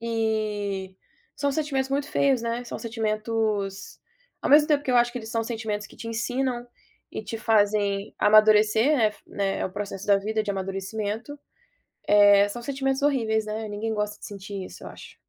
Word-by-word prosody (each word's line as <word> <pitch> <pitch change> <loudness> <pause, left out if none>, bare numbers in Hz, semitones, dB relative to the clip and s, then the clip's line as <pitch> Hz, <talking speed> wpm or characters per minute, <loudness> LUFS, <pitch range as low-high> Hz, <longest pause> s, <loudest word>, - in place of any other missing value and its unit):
E 215 -4 -2 0.4
são 285 -1 0
sentimentos 275 -2 -1
muito 280 +1 -1
feios, 270 -3 +2
né? 235 +1 -2
São - - -6
sentimentos, 215 -3 -2 0.4
ao - - -2
mesmo 295 +1 +7
tempo 295 -2 +2
que - - -1
eu 250 - +3
acho 240 0 +4
que 250 - -5
eles 220 -2 -9
são 230 -2 0
sentimentos 220 -2 -4
que - - -17
te - - -8
ensinam 245 +2 -2 0.4
e - - -5
te 215 +2 -5
fazem 205 -2 +1
amadurecer, 215 +2 +5
é 215 -1 +3
né, 195 -1 -2
o - - -9
processo 200 -1 -5
da 200 -1 +5
vida 215 +2 -1
de 210 - -3
amadurecimento, 205 +7 -4 0.7
eh, 205 -1 +6
são 240 +4 -6
sentimentos 270 +1 -1
horríveis, 225 -7 +1
né, 215 +1 -4
ninguém 210 +2 -3
gosta 210 -1 -2
de - - -10
sentir 200 -1 -7
isso, - - -12
eu - - -7
acho. - - -12
220 Hz, 175 wpm, -25 LUFS, 205-240 Hz, 0.7 s, mesmo